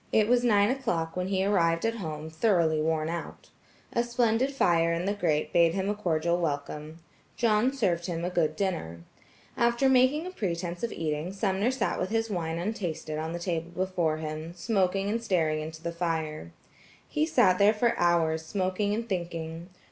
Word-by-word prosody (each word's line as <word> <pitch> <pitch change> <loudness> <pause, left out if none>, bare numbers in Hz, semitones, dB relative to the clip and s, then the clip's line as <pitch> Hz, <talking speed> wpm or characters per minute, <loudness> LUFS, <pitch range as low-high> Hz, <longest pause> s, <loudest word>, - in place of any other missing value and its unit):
It 215 -1 +4
was 245 +1 +3
nine 210 -2 +4
o'clock 175 -12 -2
when 180 0 -2
he 190 0 0
arrived 170 -4 +2
at 230 0 0
home 160 -4 -5
thoroughly 160 -4 +2
worn 155 0 0
out. 170 0 -6 0.4
A 235 - +2
splendid 240 +2 +1
fire 170 -10 +2
in 170 +1 -1
the 200 - +1
grate 160 -7 0
bade 170 -1 +4
him 195 +1 -1
a - - +1
cordial 170 -4 0
welcome. 150 0 -3 0.4
John 230 +1 +3
served 185 -10 0
him 170 -1 -3
a 180 - -2
good 155 -3 +1
dinner. 160 - -3 0.5
After 235 +3 +2
making 265 +5 +4
a 365 - -5
pretense 175 - -3
of 235 - -2
eating, 155 +2 -3
Sumner 195 +2 0
sat 260 0 -1
with 185 - -1
his 225 0 -1
wine 165 -3 -2
untasted 170 -5 -3
on 160 +1 -3
the - - -2
table 170 -1 -3
before 175 -3 -1
him, 155 +2 -6
smoking 195 0 0
and 225 +3 -1
staring 160 -7 +1
into 160 +1 -8
the 170 - -2
fire. 160 - -3 0.6
He 150 +1 0
sat 185 +3 +4
there 200 +1 +6
for 230 +2 +1
hours 165 -2 +2
smoking 190 +4 -1
and 230 +1 -4
thinking. 170 -3 -4
175 Hz, 180 wpm, -28 LUFS, 160-210 Hz, 0.6 s, there